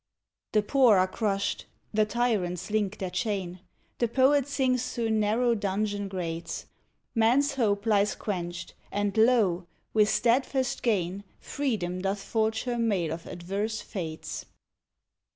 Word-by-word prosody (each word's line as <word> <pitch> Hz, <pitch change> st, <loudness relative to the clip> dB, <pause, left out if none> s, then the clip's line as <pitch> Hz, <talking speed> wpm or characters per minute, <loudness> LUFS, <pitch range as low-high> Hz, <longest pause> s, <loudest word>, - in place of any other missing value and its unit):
The 215 Hz, -1 st, +4 dB
poor 245 Hz, -2 st, +5 dB
are 185 Hz, 0 st, +4 dB
crushed; 200 Hz, 0 st, -1 dB, 0.3 s
the 215 Hz, 0 st, +3 dB
tyrants 205 Hz, -5 st, -1 dB
link 210 Hz, -1 st, 0 dB
their 185 Hz, -3 st, -4 dB
chain; 190 Hz, -6 st, -2 dB, 0.4 s
The 235 Hz, -, +3 dB
poet 265 Hz, +3 st, +3 dB
sings 260 Hz, -3 st, 0 dB
through 230 Hz, -2 st, 0 dB
narrow 220 Hz, +3 st, +2 dB
dungeon 205 Hz, 0 st, -1 dB
grates; 170 Hz, -3 st, -4 dB, 0.5 s
Man's 255 Hz, +5 st, +3 dB
hope 210 Hz, -5 st, +1 dB
lies 210 Hz, -2 st, +3 dB
quenched; 175 Hz, -3 st, -4 dB, 0.2 s
and, 205 Hz, -1 st, -1 dB
lo! 220 Hz, -7 st, +3 dB, 0.3 s
with 215 Hz, -1 st, +4 dB
steadfast 250 Hz, +4 st, +1 dB
gain 195 Hz, -4 st, 0 dB, 0.2 s
Freedom 200 Hz, -11 st, -2 dB
doth 195 Hz, +1 st, -2 dB
forge 220 Hz, 0 st, 0 dB
her 245 Hz, -2 st, -2 dB
mail 190 Hz, -9 st, +1 dB
of 165 Hz, +1 st, -8 dB
adverse 200 Hz, +5 st, -3 dB
fates. 165 Hz, -7 st, -5 dB
210 Hz, 130 wpm, -28 LUFS, 190-235 Hz, 0.5 s, poor